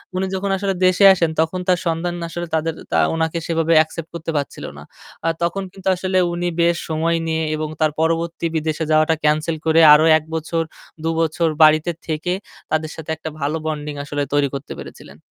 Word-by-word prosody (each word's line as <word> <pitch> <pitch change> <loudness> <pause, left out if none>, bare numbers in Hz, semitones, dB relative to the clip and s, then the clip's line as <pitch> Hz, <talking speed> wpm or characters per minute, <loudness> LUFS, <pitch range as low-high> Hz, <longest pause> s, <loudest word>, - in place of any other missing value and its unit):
উনি 190 - 0
যখন 195 +1 -2
আসলে 195 0 -1
দেশে 185 +2 +4
আসেন 170 -3 +1
তখন 165 +3 -1
তার 180 -2 +3
সন্তান 165 +1 -1 0.2
আসলে 175 +1 -5
তাদের 160 0 0 0.2
তা 80 - +2 0.2
উনাকে 160 +1 -1
সেভাবে 165 -1 +1
অ্যাকসেপ্ট 160 +1 -1
করতে 165 0 -4
পারছিল 140 - -4
না। - - -10 0.4
আ - - +2 0.2
তখন 195 +3 -1
কিন্তু 195 0 -9
আসলে 185 +1 -1 0.2
উনি 175 +1 -2
বেশ 170 0 +3
সময় 165 +1 +1
নিয়ে 160 0 0
এবং 155 0 -3
তার 155 - +3
পরবর্তী 165 +1 -1
বিদেশে 155 0 -1
যাওয়াটা 155 +1 +4
ক্যানসেল 155 +2 +1
করে 160 +1 +4
আরো 155 +1 +6
১ 155 - -7
বছর, 165 +1 -1 0.4
দুবছর 165 0 0
বাড়িতে 155 +2 +5 0.2
থেকে 155 -1 -2 0.5
তাদের 155 0 -1
সাথে 160 -1 -9
একটা 160 - -6
ভালো 150 +3 -1
বন্ডিং 150 -1 -3
আসলে 145 0 -3
তৈরি 145 -1 +3
করতে 140 +1 -6
পেরেছিলেন। - - -11
160 Hz, 185 wpm, -20 LUFS, 155-170 Hz, 0.5 s, আরো